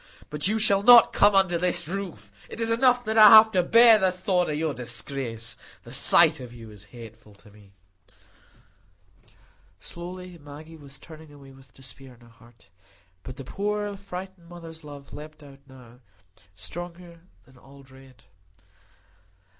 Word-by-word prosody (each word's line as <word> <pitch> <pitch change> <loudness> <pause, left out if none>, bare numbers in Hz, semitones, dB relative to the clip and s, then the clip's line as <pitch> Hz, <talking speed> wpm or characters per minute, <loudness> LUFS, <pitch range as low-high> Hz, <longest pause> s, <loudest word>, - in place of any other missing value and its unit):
But 150 +1 0
you 215 +2 -1
shall 200 -2 +3
not 235 +2 +6
come 205 0 +3
under 185 -3 +1
my 180 +1 -1 0.2
roof. 185 - -8 0.2
It - - -11
is 230 0 0
enough 245 +1 +1
that 220 +1 -1
I 215 -1 +9
have 220 +1 +7
to 185 - +1
bear 230 +4 +5
the 190 -2 +1
thought 180 -1 -2
of 150 - -3
your 155 -1 -3
disgrace; 120 -1 -6 0.3
the - - -14
sight - - +4
of 125 -2 -11
you 115 -2 -14
is 105 0 -15
hateful 110 -2 -15
to 105 +1 -20
me." 100 -1 -22 2.1
Slowly 180 - -11
Maggie 150 +2 -14
was 140 -3 -15
turning 155 +1 -16
away 140 -2 -17
with 135 0 -21
despair 130 0 -13
in 120 - -26
her 120 - -20
heart. 115 -3 -24 0.5
But 130 - -11
the 135 - -9
poor 205 +6 -5
frightened 190 -2 -11
mother's 165 -2 -13
love 145 -2 -13
leaped 155 0 -12
out 140 -1 -16
now, 125 -2 -18 0.6
stronger 170 - -10 0.3
than 130 +1 -22
all 140 +1 -18
dread. 130 -2 -20
155 Hz, 160 wpm, -24 LUFS, 130-190 Hz, 2.1 s, I